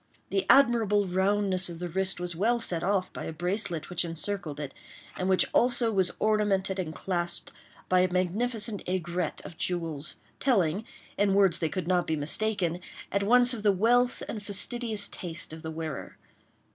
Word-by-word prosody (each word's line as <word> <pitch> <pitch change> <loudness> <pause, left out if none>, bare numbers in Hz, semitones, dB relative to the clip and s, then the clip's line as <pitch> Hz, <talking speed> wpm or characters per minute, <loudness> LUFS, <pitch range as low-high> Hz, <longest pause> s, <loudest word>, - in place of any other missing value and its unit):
The 385 - 0
admirable 230 -7 +5
roundness 190 0 +1
of 170 - -7
the 175 +1 -4
wrist 190 +2 0
was 175 -1 -4
well 225 +7 +2
set 175 -7 -2
off 190 0 0
by - - -6
a - - -4
bracelet 175 0 -2
which 180 - +1
encircled 165 -2 -4
it, 145 -2 -5 0.4
and 185 +1 -2
which 190 - +4
also 240 -1 +4
was 190 -3 +2
ornamented 200 -3 +1
and 170 -4 -3
clasped 175 +1 -3 0.4
by 185 - +3
a 185 0 +2
magnificent 205 +4 0
aigrette 180 -2 -2
of 165 - -10
jewels—telling, 170 - -1 0.3
in 200 -1 +3
words 195 -4 +4
that 160 -2 -1
could 175 +2 -3
not 180 -1 +1
be 160 - 0
mistaken, 175 +3 +1 0.3
at 200 - +1
once 245 +4 +4
of 225 - -5
the 205 -1 +4
wealth 240 +6 +2
and 215 - -5
fastidious 210 +1 -1
taste 170 -3 -5
of 160 - -9
the 160 - -6
wearer. 160 -3 -6
190 Hz, 170 wpm, -28 LUFS, 170-210 Hz, 0.4 s, admirable